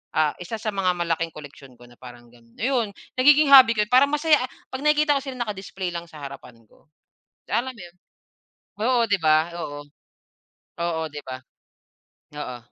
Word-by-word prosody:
ah, 155 -1 +3
isa 180 +6 -6
sa 215 0 -4
mga 190 -3 0
malaking 165 -1 -2
koleksyon 140 -3 -12
ko 120 - -18
na 120 - -20
parang 120 -1 -13
gano'n. 115 -1 -23
Ayon, 235 -5 -1 0.3
nagiging 290 +2 +5
hobby 255 -4 +9
ko 210 - +2
yon, 210 - -11
parang 260 +3 +6
masaya 300 0 +4
a 255 - -3 0.2
'pag 260 - -5
nakikita 300 -1 +3
ko - - -10
sila 265 - -5
naka-display 190 -3 -5
lang 170 0 -6
sa 155 -3 -13
harapan 135 -3 -10
ko, - - -26 0.7
alam 255 +2 -1
mo 205 - -11
'yon? 175 0 -15 0.9
Oo, 245 +1 +2
'di 205 -2 +1
ba? 155 -1 +5 0.3
oo. 145 0 -6 1.0
Oo, 170 -1 -2
'di 145 0 -8
ba? 130 0 -7 1.0
Oo. 125 -4 -6
185 Hz, 180 wpm, -23 LUFS, -, 1.0 s, hobby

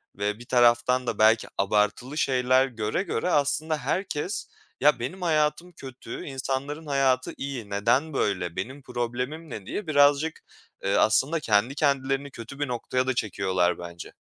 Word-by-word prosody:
ve 105 +2 -2
bir 120 - -11
taraftan 120 +1 +3
da 110 - -2
belki 110 +1 +5
abartılı 105 +8 0
şeyler 130 -1 +3
göre 115 - -2
göre 180 - -2
aslında 155 +1 +1
herkes 155 +5 -2 0.3
"Ya, 145 -3 +5
benim 155 +11 -5
hayatım 160 +1 +1
kötü, 130 -6 -9
insanların 135 +3 -4
hayatı 135 -3 +1
iyi. 130 -7 -5
Neden 120 +10 +1
böyle, 90 -8 -1
benim 135 +3 -5
problemim 125 +6 -4
ne 105 -5 -7
diye?" 205 - -5
birazcık, 145 +2 +3 0.5
ııı, 100 - +2
aslında 135 +9 +3
kendi 115 +1 +2
kendilerini 140 -1 0
kötü 130 +4 -10
bir 145 - 0
noktaya 125 +1 -1
da 130 - +2
çekiyorlar 95 -5 0
bence. 85 -1 -9
130 Hz, 145 wpm, -26 LUFS, 115-145 Hz, 0.5 s, belki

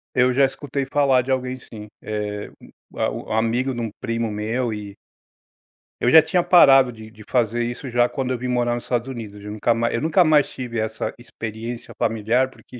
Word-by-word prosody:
Eu 125 0 +4
já 135 +2 +4
escutei 135 0 -3
falar 135 -2 +2
de 135 - -4
alguém 130 0 -1
sim. 105 -3 -11
Eh, 105 -1 -4 0.4
a - - 0
o - - -6
o - - -2
amigo 115 +4 0
de 120 - -4
um 115 - -2
primo 115 0 -2
meu 115 +4 -2
e 105 -2 -7 1.1
eu 120 - +3
já 160 +5 +9
tinha 165 +3 +1
parado 135 -8 +6
de 110 -2 -12
de 110 -1 -14
fazer 120 -1 +1
isso 120 +3 -5
já 120 0 +2
quando 130 -2 -3
eu 125 - -2
vim 125 - -4
morar 120 -1 +1
nos 120 - -5
Estados 120 0 -2
Unidos, 110 -6 -7
de 105 +1 -9
nunca 110 +3 +1
ma 115 +1 0
eu 115 - -1
nunca 165 +4 +4
mais 155 -3 +4
tive 120 -3 -5
essa 110 0 -3
experiência 115 0 -7
familiar, 115 +4 +1
porque, 125 -1 -14
120 Hz, 205 wpm, -22 LUFS, 110-130 Hz, 1.1 s, já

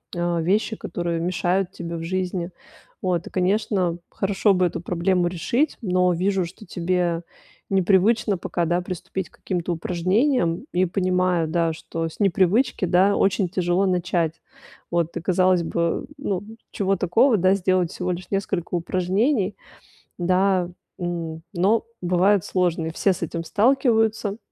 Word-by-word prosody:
э, 175 -1 0
вещи, 205 +6 +1
которые 170 -4 -3
мешают 180 +2 0
тебе 170 -2 -6
в 165 - -5
жизни, 180 0 -2 0.5
вот. 180 -3 0
Конечно, 190 -2 +1
хорошо 195 +1 +1
бы 180 -1 +2
эту 170 - -2
проблему 180 0 +1
решить, 210 - 0
но 180 -3 +2
вижу, 185 +1 0
что 200 +5 -11
тебе 175 -1 -1 0.5
непривычно 195 +2 +3
пока, 170 0 -2
да, 175 +2 +1
приступить 185 +1 -5
к - - -25
каким-то 175 -2 -3
упражнениям, 185 - +1
и 180 +1 +3
понимаю, 180 -2 +1
да, 165 0 +1
что 165 0 -4
с - - -15
непривычки, 195 +3 +2
да, 185 +3 +4
очень 195 0 +2
тяжело 180 +1 +1
начать. 175 -3 0 0.5
Вот, 170 -1 0
казалось 185 -1 +3
бы, 170 0 -1
ну, 200 -9 -2 0.3
чего 195 -1 0
такого, 220 +8 +3
да, 185 +1 +4
сделать 185 -3 +1
всего 180 0 -3
лишь 180 +1 -6
несколько 190 -3 -2
упражнений, 190 - 0 0.6
да, 185 0 +2 0.3
м, 170 -2 -4
но 200 +6 +2 0.2
бывают 180 +2 +3
сложны. 170 -3 0
Все 195 +4 +2
с 175 - -9
этим 170 +1 -3
сталкиваются. 220 - +2
180 Hz, 135 wpm, -23 LUFS, 175-195 Hz, 0.6 s, да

